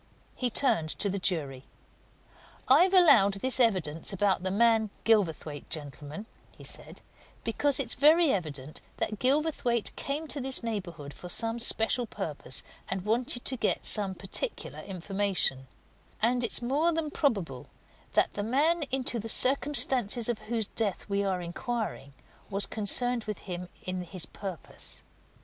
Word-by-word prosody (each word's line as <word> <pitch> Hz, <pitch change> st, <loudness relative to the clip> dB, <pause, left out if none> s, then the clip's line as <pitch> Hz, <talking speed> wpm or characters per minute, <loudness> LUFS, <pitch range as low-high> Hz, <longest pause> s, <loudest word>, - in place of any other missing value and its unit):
He 250 Hz, -, -1 dB
turned 170 Hz, -, +1 dB
to 200 Hz, -, 0 dB
the 200 Hz, -, -3 dB
jury. 145 Hz, -8 st, -1 dB, 1.0 s
"I've 375 Hz, +2 st, +5 dB
allowed 220 Hz, -, +6 dB
this 260 Hz, +7 st, -1 dB
evidence 180 Hz, -10 st, +1 dB
about 195 Hz, -1 st, +1 dB
the 185 Hz, -, -1 dB
man 220 Hz, +2 st, +3 dB
Gilverthwaite, 160 Hz, -9 st, 0 dB
gentlemen," 150 Hz, +4 st, -6 dB, 0.3 s
he -, -, -13 dB
said, -, -, -7 dB, 0.4 s
"because 275 Hz, +4 st, +2 dB
it's 245 Hz, -4 st, 0 dB
very 315 Hz, +1 st, +4 dB
evident 150 Hz, -6 st, -5 dB, 0.2 s
that 215 Hz, -1 st, -1 dB
Gilverthwaite 260 Hz, -4 st, 0 dB
came 295 Hz, +3 st, -4 dB
to 285 Hz, -, -5 dB
this 260 Hz, -1 st, -1 dB
neighbourhood 175 Hz, -10 st, -5 dB
for 180 Hz, -, -10 dB
some 225 Hz, +5 st, -1 dB
special 235 Hz, +1 st, +2 dB
purpose 150 Hz, -11 st, -1 dB, 0.3 s
and 190 Hz, 0 st, -4 dB
wanted 240 Hz, +2 st, 0 dB
to 260 Hz, -, -1 dB
get 245 Hz, -, 0 dB
some 200 Hz, -3 st, 0 dB
particular 195 Hz, -, -5 dB
information; 190 Hz, -7 st, -1 dB, 0.5 s
and 245 Hz, +3 st, +2 dB
it's 235 Hz, -, 0 dB
more 290 Hz, +7 st, +2 dB
than 320 Hz, -2 st, -2 dB
probable 190 Hz, -, -1 dB, 0.5 s
that -, -, +2 dB
the 205 Hz, -, -3 dB
man 295 Hz, +10 st, +2 dB
into 255 Hz, -2 st, 0 dB
the 225 Hz, +1 st, -5 dB
circumstances 255 Hz, -4 st, +5 dB
of 240 Hz, -3 st, -2 dB
whose 230 Hz, -2 st, 0 dB
death 210 Hz, -5 st, -2 dB
we're 200 Hz, -2 st, -1 dB
inquiring 175 Hz, -, -5 dB, 0.4 s
was 200 Hz, 0 st, +3 dB
concerned 235 Hz, +3 st, +1 dB
with 210 Hz, -1 st, -4 dB
him 180 Hz, -1 st, -7 dB
in 185 Hz, 0 st, -3 dB
his 180 Hz, -2 st, -4 dB
purpose. 185 Hz, -2 st, -3 dB
215 Hz, 140 wpm, -28 LUFS, 180-250 Hz, 1.0 s, allowed